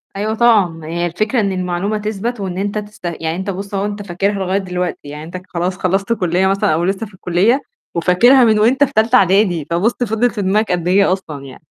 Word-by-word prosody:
أيوة 215 Hz, +2 st, -1 dB
طبعًا، 225 Hz, -4 st, +5 dB
ما 165 Hz, -1 st, -10 dB
هي 170 Hz, +1 st, -2 dB
الفكرة 215 Hz, +8 st, -1 dB
إن 200 Hz, -1 st, 0 dB
المعلومة 185 Hz, +3 st, -2 dB
تثبَت، 215 Hz, +2 st, -3 dB
وإن 185 Hz, -2 st, -4 dB
أنت 205 Hz, +2 st, -2 dB
تست 210 Hz, -3 st, -8 dB
يعني 165 Hz, -1 st, -3 dB
أنت 190 Hz, +2 st, -4 dB
بُصّ 195 Hz, +2 st, -5 dB
أهو 195 Hz, +1 st, -1 dB
أنت 205 Hz, 0 st, -4 dB
فاكرها 195 Hz, +4 st, 0 dB
لغاية 190 Hz, -1 st, -1 dB
دلوقتي، 180 Hz, -3 st, -3 dB
يعني 150 Hz, +1 st, -7 dB
أنت 175 Hz, +3 st, -7 dB
خلاص 180 Hz, +1 st, -2 dB
خلّصت 195 Hz, +4 st, 0 dB
كلية 185 Hz, -3 st, +1 dB
مثلًا 195 Hz, -2 st, +1 dB
أو 165 Hz, +2 st, 0 dB
لسّه 195 Hz, +4 st, -1 dB
في 205 Hz, -, -16 dB
الكلية، 185 Hz, +9 st, +1 dB, 0.3 s
وفاكرها 235 Hz, +10 st, +5 dB
من 215 Hz, -2 st, +4 dB
وأنت 260 Hz, +6 st, +4 dB
في 275 Hz, -, 0 dB
تالتة 225 Hz, +3 st, +3 dB
أعدادي 190 Hz, -, +3 dB
فبُصّ 180 Hz, +8 st, +1 dB
فضلِت 230 Hz, +2 st, +1 dB
في 210 Hz, -, -4 dB
دماغك 200 Hz, +2 st, +1 dB
قد 175 Hz, -1 st, -1 dB
إيه 195 Hz, 0 st, +4 dB
أصلًا 150 Hz, -7 st, -7 dB
يعني. 130 Hz, -, -12 dB
195 Hz, 220 wpm, -17 LUFS, 180-215 Hz, 0.3 s, طبعًا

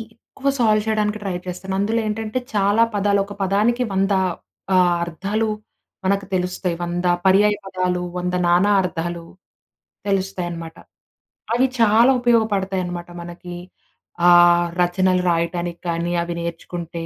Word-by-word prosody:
ఎక్కువ 275 Hz, +4 st, -4 dB
సాల్వ్ 215 Hz, -3 st, +3 dB
చేయడానికి 215 Hz, -1 st, 0 dB
ట్రై 190 Hz, -3 st, -2 dB
చేస్తాను. 190 Hz, +2 st, -5 dB
అందులో 220 Hz, +3 st, +1 dB
ఏంటంటే, 220 Hz, +3 st, -2 dB
చాలా 205 Hz, +2 st, +3 dB
పదాలు 200 Hz, 0 st, +2 dB
ఒక 205 Hz, -, -9 dB
పదానికి 215 Hz, +6 st, +1 dB
100 195 Hz, +1 st, +1 dB, 0.6 s
ఆహ్, 180 Hz, -1 st, +4 dB
అర్థాలు 200 Hz, +6 st, -2 dB, 0.6 s
మనకు 200 Hz, +1 st, +1 dB
తెలుస్తాయి. 180 Hz, -1 st, -1 dB
100 175 Hz, +1 st, -3 dB, 0.2 s
పర్యాయ 205 Hz, +2 st, +5 dB
పదాలు, 185 Hz, -2 st, -1 dB, 0.2 s
100 180 Hz, 0 st, -2 dB
నానా 180 Hz, +4 st, +4 dB
అర్థాలు 170 Hz, -1 st, -4 dB, 0.8 s
తెలుస్తాయనమాట. 175 Hz, -4 st, -3 dB, 0.8 s
అవి 250 Hz, +3 st, +3 dB
చాలా 230 Hz, +3 st, +5 dB
ఉపయోగపడతాయనమాట. 195 Hz, -7 st, 0 dB
మనకి 175 Hz, +1 st, -9 dB, 0.7 s
ఆహ్, 175 Hz, 0 st, +6 dB
రచనలు 180 Hz, +1 st, +2 dB
రాయటానికి 170 Hz, 0 st, -2 dB
కానీ, 170 Hz, +1 st, -1 dB
అవి 170 Hz, 0 st, -5 dB
నేర్చుకుంటే 170 Hz, 0 st, -6 dB
185 Hz, 115 wpm, -21 LUFS, 175-210 Hz, 0.8 s, ఆహ్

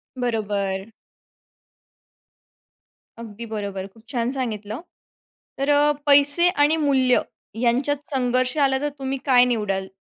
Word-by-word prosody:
बरोबर. 205 Hz, -5 st, -2 dB, 2.3 s
अगदी 230 Hz, 0 st, -8 dB
बरोबर. 200 Hz, -3 st, -4 dB
खूप 225 Hz, -1 st, -20 dB
छान 245 Hz, -1 st, -1 dB
सांगितलं. 220 Hz, -2 st, -4 dB, 0.8 s
तर 275 Hz, +1 st, -1 dB
अ, 290 Hz, +1 st, +4 dB
पैसे 290 Hz, +4 st, +6 dB
आणि 300 Hz, -1 st, +2 dB
मूल्य 265 Hz, -4 st, +2 dB, 0.4 s
यांच्यात 260 Hz, +4 st, +1 dB, 0.2 s
संघर्ष 255 Hz, +1 st, 0 dB
आला, 270 Hz, -2 st, +2 dB
तर 295 Hz, -, -1 dB
तुम्ही 270 Hz, 0 st, -3 dB
काय 250 Hz, -2 st, +5 dB
निवडाल? 210 Hz, -6 st, -1 dB
250 Hz, 110 wpm, -22 LUFS, 215-280 Hz, 2.3 s, पैसे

